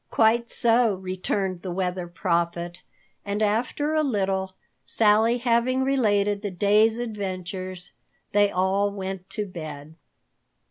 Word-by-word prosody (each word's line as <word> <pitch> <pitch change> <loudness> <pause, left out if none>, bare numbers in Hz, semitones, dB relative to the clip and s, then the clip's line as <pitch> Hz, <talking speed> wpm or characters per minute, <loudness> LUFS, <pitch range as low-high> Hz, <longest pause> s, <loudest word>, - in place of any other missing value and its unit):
"Quite 230 +1 +3
so," 235 -3 +3
returned 185 0 -3
the 185 - -6
Weather 180 0 -2
Prophet, 170 -1 -2 0.4
and 200 +1 -3
after 245 +8 0
a 310 - +3
little, 190 -7 -1 0.3
Sally 220 - +3
having 245 +2 +1
related 205 -7 +1
the 205 - -3
day's 210 +4 +3
adventures, 185 -5 -5 0.4
they 205 0 +4
all 195 +2 +1
went 190 -2 -6
to 210 +1 -3
bed. 155 -5 -8
200 Hz, 120 wpm, -25 LUFS, 185-225 Hz, 0.4 s, they